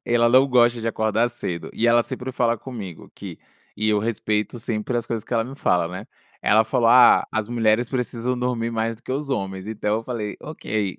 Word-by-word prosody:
ela 120 0 +3
não 130 +2 +6
gosta 120 -2 +3
de 115 - -2
acordar 110 +1 +1
cedo, 90 -8 -6
e 120 - 0
ela 120 0 +5
sempre 130 +2 -6
fala 120 -2 +1
comigo 105 - -8
que - - -9 0.4
e 110 +1 0
eu 105 -1 +2
respeito 110 +1 -1
sempre 115 0 -3
as 120 - -2
coisas 115 -3 -3
que - - -9
ela 115 -1 +1
me 130 +3 -8
fala, 90 -9 +1
né? 90 +4 -7 0.4
Ela 110 +2 +4
falou: 115 +1 +1
"Ah, 125 +1 +7
as 110 -1 -1
mulheres 115 0 +1
precisam 125 -1 -2
dormir 120 -2 -1
mais 115 0 -1
do 115 - -24
que - - -4
os 140 +1 -3
homens", 95 -5 -3
então 105 -1 -1
eu - - -7
falei: 115 -4 -5
"ok". 105 - -3
115 Hz, 215 wpm, -23 LUFS, 110-120 Hz, 0.4 s, Ah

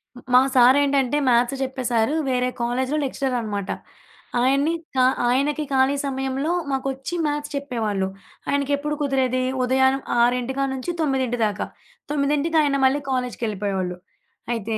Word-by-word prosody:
హ్మ్. 245 - -12
మా 250 - +9 0.2
సారేంటంటే 275 +2 +4
మ్యాథ్స్ 240 +2 +3
చెప్పే 260 0 -4
సారు 230 +5 +2
వేరే 250 0 +1
కాలేజీలో 255 +4 0
లెక్చరనమాట. 235 -7 -2 0.7
ఆయన్ని 275 +5 +2 0.2
ఖా 255 -1 +4 0.2
ఆయనకి 280 +5 +1
ఖాళీ 265 +1 +3
సమయంలో 270 +3 -2 0.2
మాకొచ్చి 270 +4 -3
మ్యాథ్స్ 295 0 -2
చెప్పేవాళ్ళు. 225 -9 -2 0.4
ఆయనకెప్పుడు 285 +1 0
కుదిరేది? 260 -3 +1 0.2
ఉదయాన 265 +1 +3 0.3
6 245 +2 +1
కాడ్నుంచి, 265 +3 -2
9 260 -5 0
దాకా 210 -1 -2 0.5
9కి 295 +3 +1
ఆయన 285 -2 +1
మళ్ళీ 275 +2 +3
కాలేజ్‌కెళ్ళిపోయేవాళ్ళు. 205 -8 -2 0.6
అయితే, 225 -1 -2
265 Hz, 120 wpm, -23 LUFS, 245-280 Hz, 0.7 s, మా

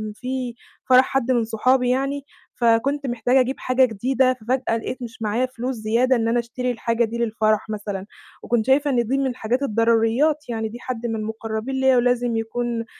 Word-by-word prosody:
في 250 0 -4 0.3
فرَح 255 0 +7
حَد 260 -1 0
من 240 -2 +2
صحابي 245 +3 +1
يعني، 275 +2 -1 0.3
فكنت 260 +5 +1
محتاجة 245 +2 +2
أجيب 260 +1 +1
حاجة 255 +1 +3
جديدة، 255 +3 +1
ففجأة 250 0 -1
لقيت 250 +3 -6
مش 240 -1 -8
معايا 220 +4 0
فلوس 255 0 -4
زيادة 230 +4 +2
إن 225 -2 0
أنا 235 +1 +2
أشتري 250 +2 -3
الحاجة 230 0 0
دي 225 +1 -5
للفَرَح 215 -2 0
مثلًا، 205 -2 -4 0.4
وكنت 230 -2 0
شايفة 280 +2 +3
إن 240 -3 +1
دي 265 +3 +1
من 275 -1 +1
الحاجات 250 +1 -2
الضروريّات، 230 +6 +2
يعني 225 -2 -2
دي 235 +2 -9
حَد 240 -2 -5
من 225 -1 -1
المقرّبين 220 +3 -4
ليّا 265 -1 +3
ولازم 245 -1 +1
يكون 230 +1 -2
240 Hz, 180 wpm, -22 LUFS, 225-260 Hz, 0.4 s, فرَح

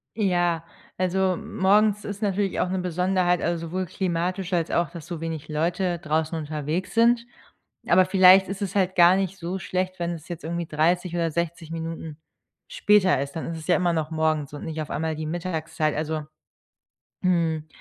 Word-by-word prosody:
Ja, 175 -5 +1 0.3
also, 185 +1 +1
m 220 +3 -8
morgens 210 +2 +3
ist 205 +1 -6
natürlich 200 -1 0
auch - - +1
'ne 190 - -1
Besonderheit, 180 0 +1
also, 170 -1 -1
sowohl 185 +2 -3
klimatisch 180 +1 -2
als 170 -2 +1
auch, 170 -4 0
dass 165 -4 -9
so 170 -3 -6
wenig 160 -2 -4
Leute 175 +4 0
draußen 160 +1 -1
unterwegs 155 +4 -3
sind. 235 +1 +4 0.6
Aber 185 +2 +5
vielleicht 190 0 +7
ist 195 +1 -5
es 200 -1 -3
halt 190 -1 +1
gar 175 +1 +7
nicht 195 0 -1
so 175 +2 -3
schlecht, 185 -1 -3
wenn 170 0 -1
es 160 -2 -9
jetzt 175 -2 -7
irgendwie 170 +1 -3
30 170 +3 +1
oder 165 -1 0
60 170 0 -3
Minuten 165 -2 -5 0.5
später 210 - +3
ist, 140 0 -5
dann 160 - -4
ist 165 - -4
es 155 - -10
ja 175 - +4
immer 180 -2 +2
noch 160 -1 -2
morgens 155 -2 0
und 145 - -7
nicht 160 -1 -4
auf 150 - -6
einmal 160 +1 -2
die 155 0 -5
Mittagszeit, 160 -2 -2
also, 155 0 -2 1.0
hm, 165 -4 +1
175 Hz, 185 wpm, -25 LUFS, 160-185 Hz, 1.0 s, vielleicht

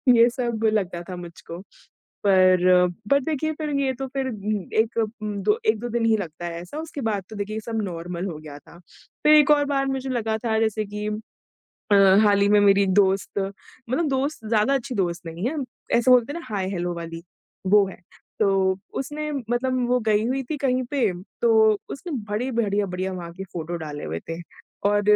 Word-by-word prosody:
ये 235 +1 +6
सब 235 -2 -3
लगता 185 -5 -1
था 185 - -4
मुझको, 170 -1 -9 0.7
पर 185 -2 +5 0.4
बट 280 +1 +3
देखिए 315 0 -1
फिर 305 0 -4
ये 270 -1 +1
तो 270 - -2
फिर 265 0 -3 0.5
एक 225 +1 +1 0.2
उम, 210 -1 -3
दो 210 +2 +2
1-2 220 +2 +1
दिन 235 0 0
ही 225 -1 +4
लगता 175 -3 -6
है 170 0 -5
ऐसा, 180 +12 -9
उसके 315 -3 -6
बाद 210 -5 -1
तो 220 - -9
देखिए 210 +2 -3
सब 225 0 -3
नॉर्मल 175 -1 -4
हो 165 -5 -5
गया 150 -2 -10
था, 170 - -17 0.5
फिर 300 - +6
एक 300 -1 +6
और 290 -1 +4
बार 275 -1 +1
मुझे 265 0 -4
लगा 225 -3 -1
था 220 -1 +2
जैसे 220 -1 0
कि 210 +1 -5
अ, 215 +1 -7 0.8
हाल 205 -1 +4
ही 200 - +4
में 210 - +6
मेरी 200 0 +5
एक 190 - +1
दोस्त 195 0 +2
मतलब 240 - -4
दोस्त 270 -2 -2
ज़्यादा 225 +4 +3
अच्छी 265 -1 -3
दोस्त 175 -3 -1
नहीं 170 +7 -3
है, 315 - -5 0.4
ऐसे 255 +2 +4
बोलते 250 +2 +4
हैं 340 - -4
ना, 335 - -11
हाय-हेलो 185 -2 -2
वाली, 165 0 -7 0.4
वो 200 0 +5
है। 190 - -9 0.4
तो 205 -2 +4 0.5
उसने 300 +2 -4
मतलब 255 -1 -1
वो 250 0 +3
गई 215 -1 +2
हुई 265 +2 0
थी 310 - -2
कहीं 255 -2 +1
पे, 250 -9 +2 0.3
तो 220 -2 +5
उसने 330 +5 -6 0.2
बड़ी 225 +6 -1
बढ़िया-बढ़िया 195 -3 -1
वहाँ 175 -2 -6
की 190 +2 -7
फ़ोटो 170 0 -4
डाले 150 -2 -6
हुए 80 +2 -4
थे 165 0 -4 0.5
और 205 0 +2
215 Hz, 195 wpm, -24 LUFS, 185-255 Hz, 0.8 s, ये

